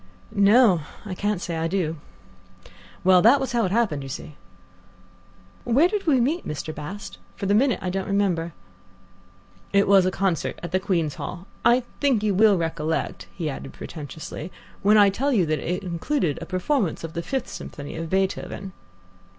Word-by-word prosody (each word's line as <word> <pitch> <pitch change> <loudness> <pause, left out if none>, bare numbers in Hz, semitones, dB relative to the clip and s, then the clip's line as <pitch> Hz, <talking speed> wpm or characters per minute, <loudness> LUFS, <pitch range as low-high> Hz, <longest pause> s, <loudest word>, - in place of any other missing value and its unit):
"No; 200 -2 +5 0.2
I 195 - -4
can't 205 +1 -1
say 170 -3 -3
I 165 0 0
do." 165 -3 -1 1.1
"Well, 185 -1 +6
that 240 +8 +6
was 265 - -2
how 235 -2 +2
it 185 - -2
happened, 205 -10 +1
you 135 - -7
see." 150 - -7 1.3
"Where 265 +8 +4
did 400 -1 -3
we 275 -5 +4
meet, 300 +9 +1
Mr. 150 +1 -5
Bast? 150 - -8 0.2
For - - -5
the 200 - +2
minute 250 +3 +3
I 180 - -1
don't 190 +1 -3
remember." 190 -5 0 1.2
"It 200 0 +3
was 195 -2 +6
a - - +3
concert 185 -3 -1
at 175 - -5
the 185 - +2
Queen's 170 -6 0
Hall. 175 +1 -6 0.2
I 245 +1 +4 0.2
think 265 -7 +2
you 210 -2 +2
will 205 0 +5
recollect," 160 -1 -2
he 165 -4 -3
added 135 -1 -6
pretentiously, 155 +2 -7 0.3
"when 210 +2 +5
I 200 -1 +6
tell 270 +8 0
you 200 -9 +3
that 155 -1 0
it 180 +3 -3
included 175 - -1
a - - -6
performance 185 - -1
of 165 -1 -6
the 170 - -3
Fifth 265 +8 -3
Symphony 145 -1 -8
of 165 0 -5
Beethoven." 190 0 -2
190 Hz, 175 wpm, -24 LUFS, 165-220 Hz, 1.3 s, Well